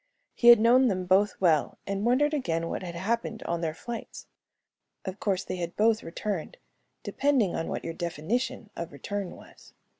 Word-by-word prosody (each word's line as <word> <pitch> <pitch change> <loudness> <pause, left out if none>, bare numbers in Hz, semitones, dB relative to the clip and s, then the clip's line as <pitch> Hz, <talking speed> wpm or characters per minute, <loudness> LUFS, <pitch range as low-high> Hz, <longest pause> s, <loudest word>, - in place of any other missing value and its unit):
He 240 - +1
had 240 -2 +10
known 245 +4 +5
them 185 -4 -1
both 195 +3 +3
well 160 -6 +2
and 200 0 -2
wondered 295 +5 +3
again 165 - -1
what - - -3
had 175 -2 -6
happened 225 +5 -2
on 170 0 -2
their 160 -2 -2
flights. 235 +6 -7 0.8
Of 190 +1 -5
course, 195 -3 0
they - - -5
had 170 -1 -4
both 220 +1 +3
returned, 175 +1 -4 0.5
depending 265 -10 +1
upon 165 - -2
what - - -4
your 165 - -3
definition 195 - -3
of 170 - -5
return 195 +7 -5
was. - - -17
195 Hz, 175 wpm, -28 LUFS, 170-235 Hz, 0.8 s, had